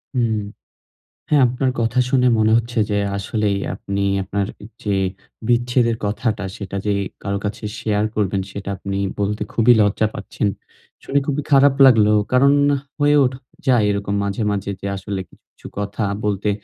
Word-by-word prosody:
হুম। 115 Hz, -3 st, +1 dB, 0.9 s
হ্যাঁ, 150 Hz, -2 st, +4 dB
আপনার 130 Hz, +2 st, 0 dB
কথা 115 Hz, +2 st, +1 dB
শুনে 125 Hz, -1 st, +3 dB
মনে 110 Hz, 0 st, +3 dB
হচ্ছে 115 Hz, +1 st, -3 dB
যে 105 Hz, -, +1 dB, 0.2 s
আসলেই 100 Hz, 0 st, -1 dB, 0.2 s
আপনি 100 Hz, +1 st, -4 dB, 0.2 s
আপনার 100 Hz, +1 st, -2 dB, 0.4 s
যে 100 Hz, -2 st, 0 dB, 0.5 s
বিচ্ছেদের 120 Hz, -1 st, +2 dB
কথাটা 105 Hz, 0 st, -1 dB
সেটা 100 Hz, -1 st, -5 dB
যে 105 Hz, -, +2 dB, 0.3 s
কারো 100 Hz, 0 st, -1 dB
কাছে 105 Hz, +2 st, -4 dB, 0.2 s
শেয়ার 105 Hz, -1 st, 0 dB
করবেন 100 Hz, -2 st, 0 dB
সেটা 100 Hz, 0 st, -6 dB
আপনি 100 Hz, +1 st, -4 dB, 0.2 s
বলতে 105 Hz, +1 st, -1 dB
খুবই 120 Hz, +1 st, +5 dB
লজ্জা 105 Hz, +1 st, +2 dB
পাচ্ছেন। 105 Hz, -, -3 dB, 0.6 s
শুনে 140 Hz, -, +1 dB
খুবই 145 Hz, 0 st, 0 dB
খারাপ 140 Hz, 0 st, +6 dB
লাগলো। 110 Hz, -5 st, +6 dB, 0.2 s
কারণ, 140 Hz, +2 st, +5 dB, 0.5 s
হয়ে 145 Hz, 0 st, +4 dB
ওঠ 125 Hz, -, 0 dB, 0.3 s
যায় 125 Hz, -5 st, +4 dB
এরকম 100 Hz, 0 st, -1 dB
মাঝে, 100 Hz, +2 st, -2 dB
মাঝে 100 Hz, -1 st, -3 dB
যে 100 Hz, -, -3 dB
আসলে 95 Hz, 0 st, -4 dB
কি -, -, -34 dB, 0.3 s
ছু -, -, -10 dB
কথা 100 Hz, +1 st, -3 dB, 0.2 s
বলতে 105 Hz, 0 st, 0 dB
105 Hz, 155 wpm, -20 LUFS, 100-120 Hz, 0.9 s, খারাপ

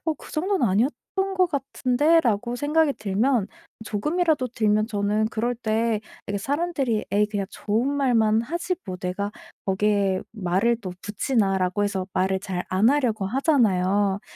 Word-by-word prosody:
어 320 Hz, -, 0 dB
'그 -, -, -14 dB
정도는 370 Hz, +2 st, 0 dB
아니었던 300 Hz, -, -1 dB
것 370 Hz, -1 st, +4 dB
같은데.'라고 260 Hz, -4 st, +1 dB
생각이 295 Hz, +3 st, +2 dB
들면 215 Hz, +1 st, 0 dB, 0.4 s
조금이라도 300 Hz, -, 0 dB
들면 215 Hz, -1 st, +2 dB
저는 210 Hz, 0 st, 0 dB
그럴 235 Hz, +2 st, -2 dB
때 225 Hz, -1 st, 0 dB, 0.3 s
이게 205 Hz, 0 st, -1 dB
사람들이 275 Hz, -, -1 dB
'에이 210 Hz, +1 st, +3 dB
그냥 205 Hz, -2 st, -3 dB
좋은 220 Hz, +5 st, -1 dB
말만 230 Hz, -6 st, +2 dB
하지. 340 Hz, +7 st, -2 dB
뭐 185 Hz, -1 st, -4 dB
내가 190 Hz, +3 st, -3 dB, 0.3 s
거기에 195 Hz, -1 st, +1 dB
말을 205 Hz, +3 st, +1 dB
또 185 Hz, -5 st, -6 dB
붙이나?'라고 200 Hz, -4 st, 0 dB
해서 195 Hz, -2 st, -1 dB
말을 190 Hz, +1 st, +1 dB
잘 185 Hz, -2 st, -4 dB
안 190 Hz, +5 st, +3 dB
하려고 235 Hz, -9 st, +1 dB
하잖아요. 205 Hz, -, +2 dB
220 Hz, 315 characters per minute, -24 LUFS, 200-275 Hz, 0.4 s, 것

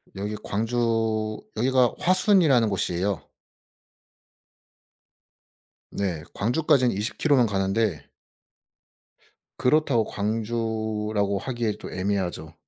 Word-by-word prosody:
여기 105 Hz, +2 st, -4 dB
광주 110 Hz, -1 st, -1 dB, 0.2 s
여기가 125 Hz, +1 st, +3 dB
화순이라는 180 Hz, -, +4 dB
곳이에요. 95 Hz, 0 st, -2 dB, 2.6 s
네. 90 Hz, -6 st, -2 dB
광주까지는 125 Hz, +1 st, +2 dB
20km 125 Hz, +6 st, +2 dB
는 115 Hz, -, +2 dB
가는데 95 Hz, -, 0 dB, 1.5 s
그렇다고 135 Hz, -3 st, +2 dB
광주라고 110 Hz, -1 st, -2 dB
하기에 120 Hz, -2 st, -2 dB
또 -, -, -8 dB
애매하죠. 95 Hz, -5 st, -2 dB
110 Hz, 210 characters per minute, -25 LUFS, 100-120 Hz, 2.6 s, 화순이라는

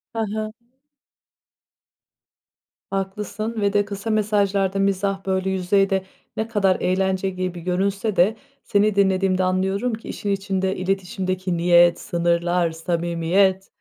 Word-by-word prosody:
He 225 Hz, -1 st, 0 dB
he. 215 Hz, 0 st, -3 dB, 2.4 s
Haklısın 210 Hz, +3 st, -3 dB
ve 200 Hz, 0 st, +1 dB
de 205 Hz, 0 st, +2 dB
kısa 200 Hz, +2 st, -5 dB
mesajlarda 200 Hz, -2 st, +1 dB
mizah, 195 Hz, 0 st, 0 dB
böyle, 190 Hz, 0 st, 0 dB
yüzeyde 190 Hz, +1 st, +1 dB, 0.3 s
ne 220 Hz, +1 st, -1 dB
kadar 195 Hz, -4 st, +2 dB
eğlence 190 Hz, +1 st, 0 dB
gibi 185 Hz, -1 st, -4 dB
görünse 195 Hz, +4 st, -1 dB
de, 195 Hz, +6 st, +3 dB, 0.3 s
seni 205 Hz, 0 st, +2 dB
dinlediğimde 190 Hz, -1 st, +2 dB
anlıyorum 190 Hz, +6 st, 0 dB
ki; 220 Hz, -, -7 dB
işin 205 Hz, -, -4 dB
içinde 190 Hz, -1 st, -1 dB
iletişimdeki 185 Hz, -1 st, -2 dB
niyet, 175 Hz, 0 st, +5 dB
sınırlar, 170 Hz, -1 st, 0 dB
samimiyet, 170 Hz, +3 st, 0 dB
190 Hz, 115 wpm, -22 LUFS, 185-200 Hz, 2.4 s, niyet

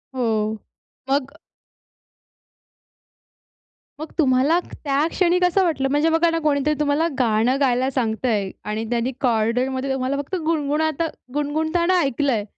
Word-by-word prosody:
हो. 220 Hz, -4 st, 0 dB, 0.6 s
मग 280 Hz, +2 st, -1 dB, 2.6 s
मग 310 Hz, -, -7 dB
तुम्हाला 275 Hz, +3 st, +3 dB
त्या 285 Hz, 0 st, -1 dB
क्षणी 360 Hz, -1 st, +2 dB
कसं 360 Hz, +2 st, +3 dB
वाटलं? 310 Hz, -6 st, 0 dB
म्हणजे 295 Hz, +3 st, +2 dB
बघा 325 Hz, +1 st, +3 dB
ना, 330 Hz, -, 0 dB
कोणीतरी 295 Hz, 0 st, +2 dB
तुम्हाला 300 Hz, +2 st, +1 dB
गाणं 235 Hz, +2 st, +2 dB
गायला 260 Hz, -1 st, +2 dB
सांगतंय 220 Hz, -5 st, -1 dB, 0.2 s
आणि 210 Hz, +1 st, -3 dB
त्यांनी 240 Hz, +2 st, 0 dB
कॉरिडॉरमध्ये 250 Hz, +3 st, 0 dB
तुम्हाला 265 Hz, +1 st, -1 dB
फक्त 285 Hz, +6 st, -4 dB
गुणगुणाता 315 Hz, 0 st, 0 dB, 0.3 s
गुणगुणताना 315 Hz, +5 st, +1 dB
ऐकलंय. 270 Hz, -5 st, 0 dB
280 Hz, 115 wpm, -22 LUFS, 250-315 Hz, 2.6 s, तुम्हाला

